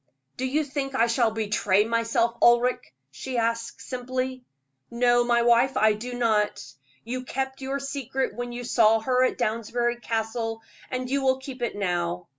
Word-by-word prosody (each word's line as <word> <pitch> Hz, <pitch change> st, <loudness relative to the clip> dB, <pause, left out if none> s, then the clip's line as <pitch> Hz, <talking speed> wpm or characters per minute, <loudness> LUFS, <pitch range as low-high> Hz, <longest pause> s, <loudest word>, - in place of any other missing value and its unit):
"Do 260 Hz, -, -2 dB
you 300 Hz, +4 st, +1 dB
think 275 Hz, -1 st, -4 dB
I 235 Hz, -, +4 dB
shall 235 Hz, 0 st, +2 dB
betray 210 Hz, -2 st, +1 dB
myself, 230 Hz, 0 st, +1 dB
Ulric?" 240 Hz, -, +3 dB, 0.2 s
she 245 Hz, -, -5 dB
asked, 230 Hz, 0 st, -1 dB
simply. 255 Hz, 0 st, -4 dB, 0.5 s
"No, 240 Hz, 0 st, +3 dB
my 240 Hz, 0 st, +2 dB
wife, 240 Hz, +3 st, +4 dB
I 215 Hz, 0 st, +4 dB
do 245 Hz, +4 st, -6 dB
not. 220 Hz, -4 st, +1 dB, 0.4 s
You 255 Hz, +3 st, -4 dB
kept 265 Hz, +1 st, -4 dB
your 270 Hz, +1 st, -2 dB
secret 275 Hz, -1 st, -3 dB
when 245 Hz, 0 st, -5 dB
you 240 Hz, +1 st, -6 dB
saw 225 Hz, -2 st, +4 dB
her 255 Hz, +2 st, +2 dB
at 255 Hz, -, +1 dB
Downsbury 240 Hz, +1 st, -1 dB
Castle, 225 Hz, 0 st, -3 dB, 0.3 s
and 255 Hz, 0 st, -3 dB
you 275 Hz, +2 st, 0 dB
will 260 Hz, -1 st, +3 dB
keep 265 Hz, -1 st, -9 dB
it 235 Hz, -, -2 dB
now. 175 Hz, -3 st, -2 dB
240 Hz, 165 wpm, -26 LUFS, 225-255 Hz, 0.5 s, I